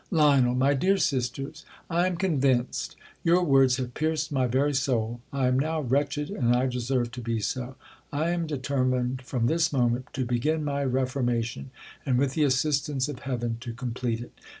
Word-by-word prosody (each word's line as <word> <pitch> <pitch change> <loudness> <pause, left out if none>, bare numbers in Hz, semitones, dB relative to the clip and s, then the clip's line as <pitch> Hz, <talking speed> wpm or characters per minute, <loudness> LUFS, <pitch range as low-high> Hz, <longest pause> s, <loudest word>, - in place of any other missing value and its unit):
.Lion. 140 -7 +4
My 135 +2 +3
dear 190 +8 +2
sisters,! 135 +1 -2 0.2
am 175 +1 +1
convinced. 135 -9 0 0.3
Your 175 +2 +4
words 135 -5 +4
have 125 -2 -4
pierced 155 +1 -1
my 130 -3 +1
very 135 +4 +1
soul. 120 -4 0
I 135 -2 0
am 130 +1 +2
now 155 +2 0
wretched, 145 +3 0
and 120 - +2
I 125 +1 +2
deserve 125 -1 -1
to 125 - -7
be 115 -1 -1
so. 130 +4 -3 0.4
I 155 +4 0
am 170 -2 -1
determined 130 -3 -1
from 125 -2 -2
this 160 +3 +2
moment 125 -2 +1
to 130 - -1
begin 150 +6 0
my 140 -1 -1
reformation, 125 - -1 0.3
and, 130 -3 +1
with 135 0 +1
the 150 0 +2
assistance 140 0 +1
of 145 - -6
Heaven, 120 -4 -3
to 120 -1 -6
complete 120 -1 -3
it. 120 - -10
130 Hz, 175 wpm, -27 LUFS, 125-145 Hz, 0.4 s, Lion